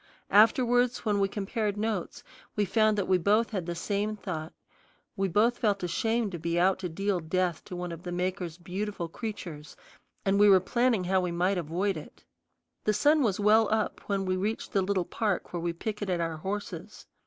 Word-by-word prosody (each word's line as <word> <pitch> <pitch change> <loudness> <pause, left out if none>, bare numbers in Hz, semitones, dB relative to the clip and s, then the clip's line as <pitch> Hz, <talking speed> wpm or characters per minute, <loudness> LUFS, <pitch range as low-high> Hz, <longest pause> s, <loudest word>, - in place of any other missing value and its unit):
Afterwards, 245 +4 +4
when 205 -2 +2
we 195 - +3
compared 205 +1 -2
notes, 210 -4 -3 0.3
we 210 - +2
found 215 +2 +3
that 200 - 0
we 185 -1 +3
both 210 +5 +2
had 185 -5 -3
the 175 - -3
same 205 +4 -1
thought: 160 -6 -5 0.6
we 195 0 0
both 220 +7 +2
felt 200 -4 +1
ashamed 225 +5 0
to 175 - -5
be 170 +2 0
out 190 +2 +3
to 185 -2 -3
deal 195 +3 -1
death 175 0 -1
to 180 - -7
one 180 0 -4
of 170 0 -7
the 180 - -6
Maker's 180 -1 -2
beautiful 185 0 -4
creatures, 170 -7 -7 0.5
and 195 0 +2
we 205 0 +7
were 190 -1 +8
planning 235 +1 +1
how 190 +1 +2
we 180 -1 -2
might 180 +2 +1
avoid 175 +4 -1
it. 155 - -11 0.6
The 215 - +2
sun 300 +6 +4
was 210 -7 +1
well 215 +1 +4
up 220 -1 0
when 195 -1 0
we 185 0 0
reached 210 +4 -2
the 195 - +2
little 190 -1 0
park 205 -6 -2
where 175 - -2
we 170 0 -1
picketed 195 0 -3
our 165 -1 -2
horses. 195 +1 -6
195 Hz, 195 wpm, -28 LUFS, 175-210 Hz, 0.6 s, were